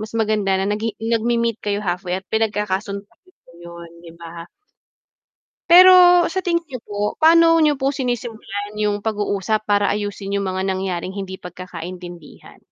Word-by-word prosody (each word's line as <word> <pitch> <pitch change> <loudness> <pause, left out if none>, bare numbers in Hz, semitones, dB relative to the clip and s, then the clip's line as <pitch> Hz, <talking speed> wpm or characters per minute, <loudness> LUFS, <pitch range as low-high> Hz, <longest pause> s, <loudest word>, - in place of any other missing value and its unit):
mas 215 +1 -7
maganda 215 -3 0
na 195 - -1
nag 210 +1 -3 0.2
nagme-meet 230 0 0
kayo 205 0 -2
halfway 180 -1 -3
at - - -13
pinagkakasun 210 -2 -2
ko 230 - -36 0.5
yun 170 0 -11
'di 170 - -12
ba? 170 0 -9 1.3
Pero 355 0 +8
sa 375 +2 -3
tingin 340 -2 -1
niyo 255 -6 -8
po, 205 0 -3
paano 330 +1 +6
niyo 295 -2 +2
po 275 +1 -1
sinisimulan 225 -5 -5
yung 210 -1 -1
pag-uusap 210 0 -1
para 205 0 +3
ayusin 205 -1 -3
yung 200 - 0
mga 190 0 -3
nangyaring 190 -1 -3
hindi 190 -1 -6
pagkakaintindihan? 175 -1 -10
205 Hz, 145 wpm, -20 LUFS, 190-235 Hz, 1.3 s, Pero